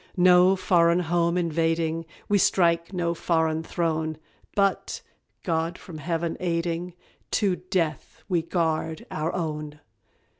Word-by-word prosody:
"No 180 +1 +6
foreign 175 -2 +3
Home 170 +1 +1
invading, 165 -1 0 0.2
We 205 -1 +3
strike 170 -2 +2
no 175 -3 -1
foreign 160 -2 0
throne; 160 -2 -1 0.4
But, 195 -2 0 0.4
God 165 0 -1
from 165 -4 -10
Heaven 165 +1 -2
aiding, 170 0 -2 0.3
To 195 -4 +1
death 175 -3 -3
we 175 -4 +1
guard 160 -1 -1
OUR 155 +2 -1
OWN." 150 -3 -4
170 Hz, 115 wpm, -26 LUFS, 160-180 Hz, 0.4 s, No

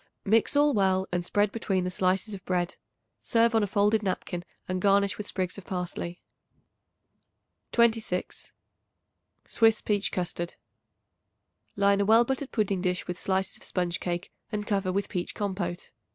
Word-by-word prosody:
Mix 220 +6 +3
all 290 0 +5
well 190 -2 +2
and 175 0 0
spread 205 +3 +1
between 195 -4 -1
the 180 - -2
slices 190 +3 +1
of 190 -1 -7
bread. 180 -2 -1 0.4
Serve 230 0 +3
on 225 - +4
a 205 - +1
folded 205 +2 +2
napkin 185 -3 -3 0.2
and 185 0 -2
garnish 200 0 +3
with 210 - -5
sprigs 185 0 -3
of 190 - -14
parsley. 180 -1 -4 1.5
26. 225 -6 +1 0.9
Swiss 225 -1 +3
Peach 205 -1 0
Custard. 175 -1 -3 1.2
Line 200 0 +3
a - - +2
well 225 +3 +6
buttered 265 +2 -3
pudding 200 -5 0
dish 180 -1 -1
with 180 0 -5
slices 190 0 -1
of - - -12
sponge 175 -2 -1
cake 175 0 -3 0.2
and 210 -1 -2
cover 195 -3 0
with 200 +1 -1
peach 180 -3 -4
compote. 185 -3 -3
195 Hz, 150 wpm, -28 LUFS, 180-210 Hz, 1.5 s, well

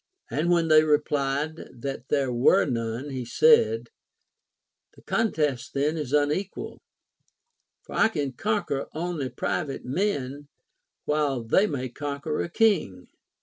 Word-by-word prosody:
And 155 +4 0
when 170 -2 +3
they 155 -1 +6
replied 150 0 0 0.2
that 135 -2 -5
there 135 -4 +1
were 120 +3 +4
none, 120 +2 -3
he 130 -2 -4
said, 455 - +4 1.1
The - - -18
contest 150 - -1
then 145 +3 +1
is 150 -5 -4
unequal, 150 +7 -1 1.0
for - - -11
I - - +4
can 145 -10 -2
conquer 200 - -1
only 160 -5 -3
private 140 0 -3
men, 140 -3 -2 0.6
while 145 -5 0
they 190 - +3
may 130 -6 -3
con(|uer 145 +3 -3
a - - -5
king. 170 - +1
145 Hz, 125 wpm, -26 LUFS, 135-165 Hz, 1.1 s, they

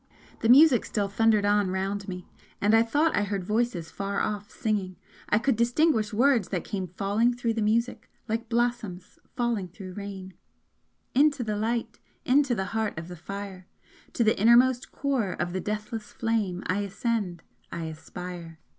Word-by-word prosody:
The 225 - 0
music 270 -1 +7
still 205 -2 -1
thundered 215 0 +3
on 205 -1 +3
round 195 +2 -2
me 180 -2 -6 0.3
and 205 +2 +2
I 225 - +7
thought 295 +8 +2
I - - +2
heard 200 -2 -2
voices 210 -4 -1
far 200 0 -3
off 205 -1 -2
singing 200 -4 -2 0.3
I - - +4
could 245 +3 +2
distinguish 235 -1 +2
words 240 -2 +3
that 180 -4 -2
came 190 -3 -4
falling 205 +7 +1
through 235 -2 -1
the 225 - -2
music, 230 +3 0 0.2
like 225 +1 -3
blossoms 235 -6 -2 0.2
falling 235 -6 -1
through 185 +1 -10
rain: 195 -1 -7 0.8
Into 280 -1 +3
the 215 -2 -2
Light, 225 +1 -2 0.3
Into 265 -1 +3
the 190 -2 -2
heart 220 -4 -1
of 165 +2 -6
the 180 - -7
fire! 190 +2 -8 0.5
To 235 - +2
the 220 -3 +2
innermost 245 +3 +5
core 255 -9 -1
of 175 +1 -3
the 185 - -2
deathless 210 +2 -4
flame 215 -6 -1
I 185 +2 0
ascend 200 -3 -2 0.3
I 170 - -4
aspire! 165 +1 -8
210 Hz, 165 wpm, -27 LUFS, 190-235 Hz, 0.8 s, music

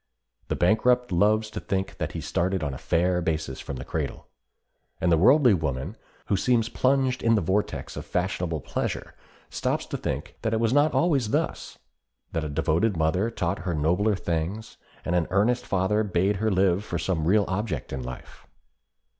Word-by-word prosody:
The - - -1
bankrupt 125 +6 +2
loves 110 +4 +2
to - - -4
think 95 -1 -3
that - - -3
he - - -4
started 95 -1 -1
on 70 -2 -2
a 65 - -7
fair 90 +1 +1
basis 80 -5 -2
from 70 - -6
the 65 - -7
cradle. - - -4 0.7
And 90 - +1
the 85 - +5
worldly 125 - +6
woman, 80 - -2 0.3
who 100 - +1
seems 115 +2 +2
plunged 130 +1 +1
in 115 0 +3
the 105 - +2
vortex 95 +5 -1
of - - -5
fashionable 90 -4 -2
pleasure, - - -3 0.4
stops - - -1
to - - -4
think - - -4
that 110 0 0
it - - 0
was 115 +1 +1
not 145 +2 +3
always 140 -10 +2
thus, - - -2 0.5
that 80 - -2
a 75 - -3
devoted 85 +7 +1
mother 80 +7 +1
taught 90 -7 -2
her 85 -1 -2
nobler 90 +8 +2
things, 85 +5 -3 0.3
and 90 - -1
an 85 -2 +2
earnest 115 +6 +1
father 95 +3 +1
bade 95 0 +1
her 110 +2 +1
live 95 -1 +2
for 85 - -3
some 80 -2 -1
real 100 +2 +4
object 95 - -3
in 65 - -3
life. 65 0 -9
95 Hz, 180 wpm, -26 LUFS, 85-110 Hz, 0.7 s, worldly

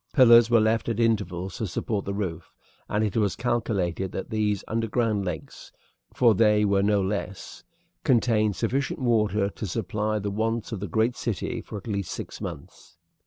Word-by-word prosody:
Pillars 120 -3 +7
were 120 -1 +5
left 110 +2 +1
at 115 -1 -2
intervals 95 -5 0
to 110 - -2
support 100 +3 -3
the 100 - -3
roof, 85 -5 -4 0.4
and 105 +1 +1
it 105 -3 -1
was 105 -4 +1
calculated 100 -7 -1
that 95 - -6
these 105 -2 0
underground 115 -2 0
lakes 85 -5 -7 0.4
for 120 -3 +4
they 105 0 +4
were 100 -1 +2
no 100 0 +2
less 95 -1 -4 0.4
contained 115 - +2
sufficient 135 +9 -1
water 105 -5 +2
to 105 - -6
supply 105 +3 -2
the 100 -1 -3
wants 115 +3 -2
of 110 - -3
the 100 - -4
great 110 +7 +1
city 115 +1 -3
for 110 - -8
at 100 - -10
least 100 -4 -3
six - - -7
months. 70 - -9
105 Hz, 170 wpm, -26 LUFS, 100-115 Hz, 0.4 s, Pillars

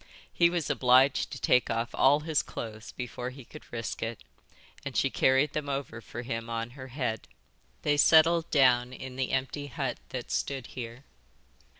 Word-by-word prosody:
He 170 -1 +4
was 170 -3 -2
obliged 130 +2 +4
to - - -6
take 125 - +3
off 115 +1 -1
all 145 +3 +4
his 155 -1 +1
clothes 110 -1 -7
before 125 0 -5
he 130 -1 -12
could 150 - -13
risk 115 -1 -4
it, 115 0 -4 0.6
and - - -4
she - - +2
carried 135 +3 +3
them 150 -2 -3
over 135 -4 -4
for 120 +3 -7
him 115 -1 -4
on 115 0 -3
her 130 0 -9
head. 125 -4 -3 0.6
They 145 0 +2
settled 165 +2 +5
down 125 -3 +4
in 130 0 -8
the 130 -1 -1
empty 140 +2 -2
hut 125 - -3
that - - -6
stood 135 -3 -2
here. 120 +2 -8
130 Hz, 175 wpm, -29 LUFS, 120-145 Hz, 0.6 s, settled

